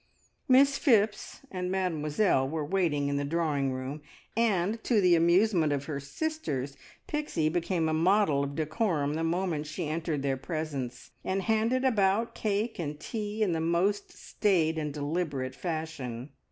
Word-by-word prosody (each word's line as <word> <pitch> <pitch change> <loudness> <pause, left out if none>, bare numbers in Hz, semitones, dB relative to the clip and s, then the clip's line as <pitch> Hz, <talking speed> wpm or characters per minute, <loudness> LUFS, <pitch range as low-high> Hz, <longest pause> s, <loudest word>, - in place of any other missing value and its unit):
Miss 275 +2 +5
Phipps 215 -5 +2
and 180 -1 -3
Mademoiselle 165 -5 +1
were 155 0 -2
waiting 150 -5 +1
in 140 0 0
the 145 - -1
drawing 145 -3 0
room, 130 +3 -5 0.3
and, 220 -1 +1
to 230 -4 +3
the 180 -3 +5
amusement 170 -1 +3
of 140 -1 -1
her 145 -2 -3
sisters, 140 - -3 0.3
Pixie 300 - -1
became 170 0 0
a 160 - 0
model 165 -3 +3
of 140 0 -4
decorum 155 -2 0
the 160 +1 -2
moment 165 -2 -1
she 150 +2 -4
entered 155 -2 -2
their 135 -1 0
presence, 140 -5 -5
and 190 +1 -1
handed 230 +5 +1
about 220 -2 +2
cake 215 +1 -1
and 150 -3 -4
tea 215 +3 -3
in 195 - +1
the 165 -1 -1
most 180 +5 +1
staid 165 -6 0
and 150 -1 -2
deliberate 145 -3 -2
fashion. 150 -7 -5
165 Hz, 155 wpm, -29 LUFS, 145-200 Hz, 0.3 s, Miss